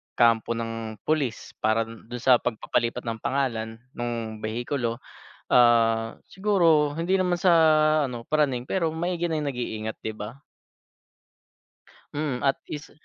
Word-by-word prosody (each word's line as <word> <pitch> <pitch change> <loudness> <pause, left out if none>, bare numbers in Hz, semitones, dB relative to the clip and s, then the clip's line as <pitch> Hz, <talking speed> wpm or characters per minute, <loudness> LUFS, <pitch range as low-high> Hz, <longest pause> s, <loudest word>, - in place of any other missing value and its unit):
kampo 115 -1 +3
ng 115 -1 -4
pulis 145 -7 -1
para 110 +1 +2
dun 115 0 -12
dun 120 0 -7
sa 125 -2 +6
pagpapalipat 120 +1 -1
ng 115 -1 -4
pangalan 120 -3 -1 0.2
nung 115 -2 -4
behikulo, 120 +2 -3 0.5
ah, 115 -2 +4
siguro 170 -7 +3
hindi 170 +5 0
naman 180 -2 0
sa 180 -2 +5 0.5
ano, 120 -3 -6
praning 135 -5 +1
pero 165 -4 0
maigi 175 +1 -2
na 155 - 0
yung 145 - -2
nag-iingat, 110 -4 -4
'di 110 - -2
ba? 110 +4 -8 1.8
Mm 145 -4 -2
at 135 -1 +3
is 150 0 -7
120 Hz, 135 wpm, -26 LUFS, 115-150 Hz, 1.8 s, sa